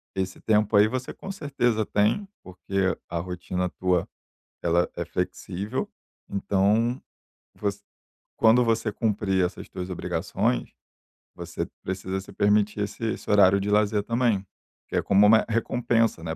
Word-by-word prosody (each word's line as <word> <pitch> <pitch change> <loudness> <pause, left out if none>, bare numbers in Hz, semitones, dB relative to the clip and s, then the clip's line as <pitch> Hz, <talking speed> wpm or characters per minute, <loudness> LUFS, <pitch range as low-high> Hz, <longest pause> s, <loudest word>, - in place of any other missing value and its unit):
esse 95 -1 -3
tempo 110 -1 +2
aí 105 +1 +7
você 125 +3 -4
com 195 - -7
certeza 125 - 0
tem, 105 - +1 0.2
porque 95 +1 -2
a 85 - -2
rotina 90 +1 -3
tua 90 -1 0 0.6
ela 85 +1 +2
é - - -2
flexível, 100 +7 -3 0.4
então 105 +5 +1 0.6
você 100 -1 -3 0.6
quando 115 +2 +5
você 115 -2 0
cumprir 100 -3 +1
essas - - -8
tuas 90 0 -6
obrigações, 65 -7 -1 0.6
você - - -5 0.2
precisa 95 0 -3
se 100 +1 -13
permitir 105 +1 +2
esse 105 - -6
esse - - -9
horário 100 -1 +6
de 100 - -2
lazer 105 0 +3
também, 115 -3 +1 0.4
que - - -6
é - - +3
como 100 +1 +5
uma 110 +1 +6
recompensa, 115 -3 +1
né, 80 -1 -3
105 Hz, 140 wpm, -26 LUFS, 95-115 Hz, 0.6 s, aí